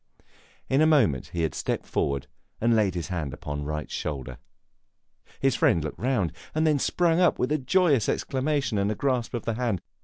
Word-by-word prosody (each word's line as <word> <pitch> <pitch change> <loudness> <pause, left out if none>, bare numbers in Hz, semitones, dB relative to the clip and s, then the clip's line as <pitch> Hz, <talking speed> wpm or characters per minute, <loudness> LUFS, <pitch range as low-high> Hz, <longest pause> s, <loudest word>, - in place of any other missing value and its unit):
In 135 +3 +2
a 155 - +5
moment 130 - +3
he 85 -1 -3
had 80 - 0
stepped - - -2
forward 70 -1 -1 0.3
and 115 +1 +3
laid 100 -5 +2
his 85 +1 -4
hand 80 -7 -3
upon 75 0 -5
Wright's 75 -1 -4
shoulder. 65 -4 -4 1.0
His 135 -1 +2
friend 85 -6 +3
looked 75 - -5
round, 120 -9 0 0.2
and 155 +1 +2
then 150 -2 +3
sprang 170 +3 +2
up 180 - +4
with 125 - -1
a 155 - +2
joyous 140 - +3
exclamation 135 -4 0
and 100 +2 0
grasp 125 -4 0
of 120 - -4
the 115 - 0
hand. 115 -5 -1
115 Hz, 185 wpm, -26 LUFS, -, 1.0 s, a